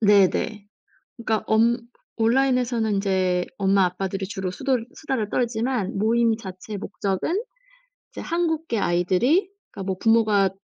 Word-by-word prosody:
네네. 205 Hz, 0 st, +3 dB, 0.5 s
그러니까 220 Hz, -2 st, -1 dB
엄 230 Hz, +2 st, +3 dB, 0.4 s
온라인에서는 240 Hz, -2 st, +2 dB
인제 185 Hz, -2 st, +1 dB
엄마 195 Hz, -1 st, +3 dB
아빠들이 190 Hz, +2 st, -3 dB
주로 190 Hz, -3 st, -4 dB
수돌 250 Hz, +1 st, -1 dB
수다를 255 Hz, -9 st, -2 dB
떨지만 235 Hz, -4 st, -1 dB
모임 225 Hz, +2 st, +2 dB
자체 200 Hz, 0 st, -8 dB
목적은 205 Hz, -, -2 dB, 0.7 s
이제 -, -, -7 dB
한국계 320 Hz, -8 st, -1 dB
아이들이 195 Hz, -, +2 dB, 0.2 s
그러니까 195 Hz, -, -7 dB
뭐 190 Hz, -1 st, -2 dB
부모가 215 Hz, -3 st, +3 dB
220 Hz, 310 characters per minute, -24 LUFS, 195-240 Hz, 0.7 s, 네네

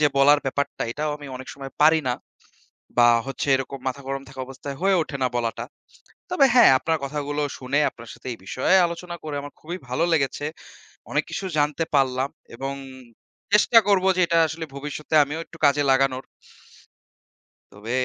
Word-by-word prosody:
যে 150 Hz, -, +5 dB
বলার 145 Hz, +2 st, +6 dB
ব্যাপারটা 140 Hz, +1 st, -2 dB
এটাও 150 Hz, +2 st, -2 dB
আমি 145 Hz, -1 st, -11 dB
অনেক 130 Hz, 0 st, -10 dB
সময় 135 Hz, -1 st, -9 dB
পারি 160 Hz, +1 st, +6 dB
না। 125 Hz, -, +1 dB, 0.8 s
বা 120 Hz, -, +7 dB, 0.2 s
হচ্ছে 135 Hz, +1 st, -4 dB
এরকম 135 Hz, +1 st, -5 dB
মাথা 140 Hz, +2 st, -6 dB
গরম 135 Hz, 0 st, -3 dB
থাকা 135 Hz, -1 st, -9 dB
অবস্থায় 135 Hz, +1 st, -8 dB
হয়ে 195 Hz, 0 st, +4 dB
উঠে 150 Hz, -2 st, -6 dB
না 130 Hz, -, +3 dB
বলাটা। 115 Hz, 0 st, -2 dB, 0.7 s
তবে 290 Hz, -6 st, +5 dB
হ্যাঁ, 240 Hz, -, +8 dB
আপনার 160 Hz, -1 st, 0 dB
কথাগুলো 145 Hz, +1 st, -3 dB, 0.2 s
শুনে 135 Hz, +3 st, 0 dB
আপনার 115 Hz, -1 st, -13 dB
সাথে -, -, -12 dB
এই -, -, -11 dB
বিষয়ে 130 Hz, -, +2 dB
আলোচনা 170 Hz, +1 st, -5 dB
করে 150 Hz, -2 st, -5 dB
আমার 145 Hz, 0 st, -9 dB
খুবই 170 Hz, +3 st, -5 dB
ভালো 130 Hz, +7 st, 0 dB
লেগেছে। 145 Hz, -1 st, 0 dB, 0.7 s
অনেক -, -, +1 dB
কিছু 195 Hz, -, -4 dB
জানতে 150 Hz, +2 st, +1 dB
পারলাম 135 Hz, -1 st, +2 dB, 0.3 s
এবং 135 Hz, +2 st, -4 dB, 0.8 s
চেষ্টা 210 Hz, +3 st, +6 dB
করবো 190 Hz, -2 st, +3 dB
যে 185 Hz, -, +2 dB
এটা 165 Hz, -, +2 dB
আসলে 160 Hz, +1 st, -5 dB
ভবিষ্যতে 150 Hz, +2 st, -5 dB
আমিও 150 Hz, +3 st, -5 dB
একটু 165 Hz, -, -15 dB
কাজে 145 Hz, +1 st, +3 dB
লাগানোর। 135 Hz, -1 st, +2 dB, 1.5 s
তবে 105 Hz, +3 st, -9 dB
145 Hz, 170 wpm, -24 LUFS, 135-160 Hz, 1.5 s, হ্যাঁ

